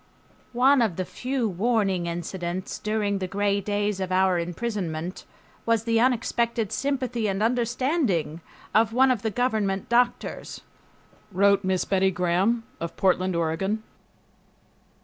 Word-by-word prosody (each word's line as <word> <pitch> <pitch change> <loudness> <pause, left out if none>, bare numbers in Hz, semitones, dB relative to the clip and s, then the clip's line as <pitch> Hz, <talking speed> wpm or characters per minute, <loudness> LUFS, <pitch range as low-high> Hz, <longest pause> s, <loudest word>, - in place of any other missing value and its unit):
"One 265 +1 +5
of 215 -7 +1
the 185 - -2
few 255 +1 -2
warning 195 -3 0
incidents 175 +1 -4
during 210 -2 -1
the 185 - -3
gray 200 +1 0
days 205 0 -1
of 185 -1 -3
our 185 -1 +3
imprisonment 175 -2 -4 0.4
was 230 -1 +1
the 230 -1 +2
unexpected 235 -2 +1
sympathy 250 -1 -1
and 195 +1 -1
understanding 240 - 0 0.3
of 220 +2 +3
one 260 +2 +5
of 240 -5 0
the 225 - -1
government 210 -4 -1
doctors," 245 +1 0 0.7
wrote 200 +1 +3
Miss 185 -1 0
Betty 190 -1 +2
Gram 185 +6 +1 0.2
of 170 - -5
Portland, 185 -1 +2
Oregon. 170 +6 -1
205 Hz, 130 wpm, -25 LUFS, 185-235 Hz, 0.7 s, One